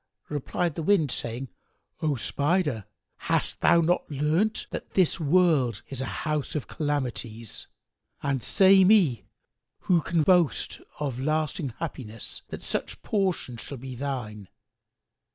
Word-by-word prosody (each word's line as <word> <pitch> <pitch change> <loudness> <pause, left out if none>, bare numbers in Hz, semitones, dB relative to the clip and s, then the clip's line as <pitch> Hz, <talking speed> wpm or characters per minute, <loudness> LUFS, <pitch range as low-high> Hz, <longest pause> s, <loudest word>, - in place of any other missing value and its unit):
Replied 150 +3 -1
the 165 - -4
Wind, 160 -5 +3
saying, 120 +3 -3 0.5
"O 155 -3 +1
Spider, 140 - 0 0.3
hast - - -1
thou 170 - +5
not 175 +2 +1
learnt 155 +9 +1
that - - -7
this 185 -3 +3
world 150 - +3
is 135 -2 -4
a - - -1 0.2
house 150 -2 -1
of 150 - -2
calamities; 120 -7 -3 0.6
and, 135 -2 0
say 190 - +6
me, 180 - +4 0.6
who 175 -3 +3
can 165 0 +1
boast 175 -3 +2 0.2
of 135 -4 -2
lasting 155 +1 -1
happiness 120 -9 -5
that - - -7
such - - -3
portion 185 - -1
shall 140 +4 -7
be 130 +1 -7
thine? 120 -6 -5
145 Hz, 130 wpm, -27 LUFS, 125-170 Hz, 0.6 s, say